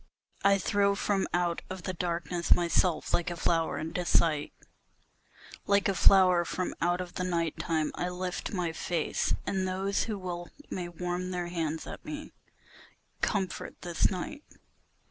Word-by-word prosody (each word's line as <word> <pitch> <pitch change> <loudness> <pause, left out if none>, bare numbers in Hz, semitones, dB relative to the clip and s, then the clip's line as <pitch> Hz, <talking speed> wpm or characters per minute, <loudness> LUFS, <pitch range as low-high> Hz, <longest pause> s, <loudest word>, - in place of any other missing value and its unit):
I 200 0 +6
throw 200 +1 +2
from 200 -1 +1
out 175 -1 +1
of 185 -1 -6
the 185 - -2
darkness 170 -1 +1
my 175 - 0
self 170 0 +1
like 175 - +2
a 175 - -3
flower 165 -1 +1
into 165 +3 -2
sight, 160 -3 +2 1.2
Like 200 0 +4
a 195 - +2
flower 185 -2 +6
from 180 +1 -2
out 175 +2 +2
of 180 -1 -7
the 180 - -2
night 170 -3 -1
time, 160 -2 0
I 180 - -2
lift 180 0 -3
my 180 -4 -1
face, 165 -1 0
and 190 -1 0
those 195 +2 0
Who 215 -2 -3
will 175 -2 -5 0.2
may 175 -2 -3
warm 180 +1 -3
their 175 -1 -2
hands 160 -2 -2
at - - -8
me, 305 -1 -6 0.9
comfort 195 -4 -1
this 175 -1 +2
night. 280 +11 -5
180 Hz, 160 wpm, -30 LUFS, 170-190 Hz, 1.2 s, I